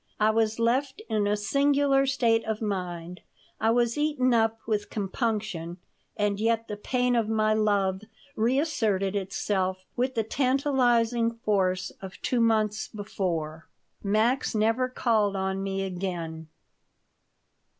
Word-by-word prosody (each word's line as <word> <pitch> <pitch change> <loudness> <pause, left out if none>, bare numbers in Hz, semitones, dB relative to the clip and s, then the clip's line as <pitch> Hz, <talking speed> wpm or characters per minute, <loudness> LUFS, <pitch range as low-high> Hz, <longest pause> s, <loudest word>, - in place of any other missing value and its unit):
I 215 0 +4
was 220 0 +1
left 260 - 0
in 210 -2 +1
a 210 +1 +1
singular 275 +4 +2
state 235 -4 +2
of 220 -1 -2
mind. 180 -4 -4 0.4
I 220 - +2
was 235 +2 +2
eaten 290 -5 +2
up 225 -1 +2
with 210 -2 -1
compunction, 205 -5 -3 0.4
and 205 -1 0
yet 230 +1 +1
the 210 - -4
pain 250 +3 0
of 225 -2 +1
my 215 -1 +2
love 200 -3 +1 0.3
reasserted 220 -6 +1
itself 190 -1 -1
with 255 +1 -1
the 225 - +1
tantalizing 245 -2 +2 0.2
force 185 -3 +1
of 190 -1 -9
two 250 - +1
months 215 -2 +1
before. 170 -7 -4 0.4
Max 220 +5 +1
never 225 +4 +2
called 220 -5 +1
on 190 0 -1
me 195 0 -2
again. 175 -4 -4
215 Hz, 130 wpm, -27 LUFS, 195-240 Hz, 0.4 s, I